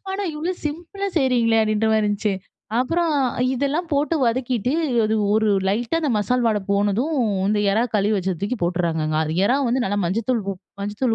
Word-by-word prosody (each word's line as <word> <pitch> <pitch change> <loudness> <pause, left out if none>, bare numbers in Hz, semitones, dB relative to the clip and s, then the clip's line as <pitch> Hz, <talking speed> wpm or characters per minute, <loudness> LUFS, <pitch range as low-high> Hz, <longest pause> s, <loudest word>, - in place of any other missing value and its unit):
ஆனா 390 +1 -2
இவ்ளோ 320 +5 -2
சிம்பிளா 345 +6 -4
செய்கிறீங்ளே! 245 -6 +3
அப்படின்ற 215 0 +1
மாரி 220 - +3
இருந்துச்சு. 205 0 0 0.5
அப்புறம் 330 +6 +1 0.4
இதெல்லாம் 285 +6 -1
போட்டு 295 +3 +1
வதக்கிட்டு 245 0 0 0.3
அது 220 +1 +1 0.2
ஒரு 220 0 +2 0.2
லைட்டா, 235 +10 0
அந்த 300 -4 0
மசால் 245 +4 0
வாட 215 -2 +2
போனதும், 205 +9 +1 0.3
இந்த 210 0 +1
எறா 220 +3 +2
கழுவி 210 +1 +2
வெச்சத 190 -1 -1
தூக்கி 205 +5 -1
போட்டர்றாங்கங்க. 165 -3 0 0.3
எறா 255 - +3
வந்து 250 +2 +1
நல்லா 205 +1 -1
மஞ்சதூள் 225 +7 0
உப் 185 - -14 0.2
மஞ்சதூள் 210 +4 -1
230 Hz, 160 wpm, -22 LUFS, 205-275 Hz, 0.5 s, செய்கிறீங்ளே